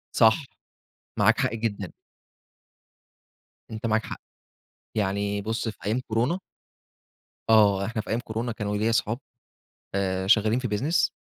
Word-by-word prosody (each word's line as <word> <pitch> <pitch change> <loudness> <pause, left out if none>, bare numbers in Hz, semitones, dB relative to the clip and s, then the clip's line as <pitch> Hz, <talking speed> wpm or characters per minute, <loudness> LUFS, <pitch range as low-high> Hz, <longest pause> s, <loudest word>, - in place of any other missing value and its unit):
صح، 115 +5 +5 0.7
معاك - - +4
حق - - +1
جدًا. 105 -5 -3 1.8
أنت 110 +1 -5
معاك 110 0 +2
حق، - - -7 0.7
يعني 100 0 0
بُص 115 +2 -2
في 110 - -9
أيام 110 +5 +1
كورونا 120 +11 +1 1.1
آه 100 -3 +5
إحنا 110 -1 -2
في - - -13
أيام 115 +2 +1
كورونا 115 +1 -3
كانوا 105 -2 -2
ليَّ 110 +2 +1
صحاب 115 +2 0 0.8
آآ، 95 -1 0
شغالين 110 +3 +4
في 125 -2 -2
business 135 - +1
110 Hz, 130 wpm, -26 LUFS, 100-115 Hz, 1.8 s, صح